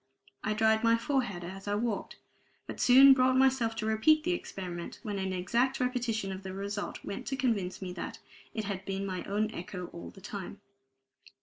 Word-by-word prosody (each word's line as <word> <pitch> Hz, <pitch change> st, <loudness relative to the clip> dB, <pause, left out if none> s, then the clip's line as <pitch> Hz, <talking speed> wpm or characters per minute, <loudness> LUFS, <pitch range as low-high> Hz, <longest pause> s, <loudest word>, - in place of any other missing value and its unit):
I 215 Hz, -, 0 dB
dried 220 Hz, +1 st, +3 dB
my 230 Hz, 0 st, +5 dB
forehead 230 Hz, -8 st, -1 dB
as 195 Hz, +3 st, -8 dB
I 205 Hz, -, +1 dB
walked, 220 Hz, -1 st, -2 dB, 0.5 s
but -, -, -7 dB
soon 270 Hz, +2 st, +9 dB
brought 255 Hz, 0 st, +3 dB
myself 260 Hz, -4 st, +3 dB
to 215 Hz, -, -3 dB
repeat 220 Hz, +9 st, +4 dB
the 355 Hz, -, 0 dB
experiment 180 Hz, -, -5 dB
when 205 Hz, -3 st, -3 dB
an 190 Hz, 0 st, -2 dB
exact 235 Hz, +9 st, +1 dB
repetition 240 Hz, -5 st, -1 dB
of 190 Hz, 0 st, -5 dB
the 190 Hz, -1 st, -6 dB
result 200 Hz, +1 st, -4 dB
went 200 Hz, +6 st, -5 dB
to 270 Hz, -, -1 dB
convince 215 Hz, -9 st, -1 dB
me 180 Hz, -1 st, -5 dB
that -, -, -6 dB, 0.4 s
it 220 Hz, -2 st, -2 dB
had 195 Hz, -2 st, -4 dB
been 195 Hz, 0 st, -3 dB
my 185 Hz, -2 st, -3 dB
own 215 Hz, +2 st, 0 dB
echo 180 Hz, -2 st, -6 dB
all 170 Hz, -, -8 dB
the -, -, -14 dB
time. 195 Hz, 0 st, -7 dB
215 Hz, 190 wpm, -31 LUFS, 195-245 Hz, 0.5 s, soon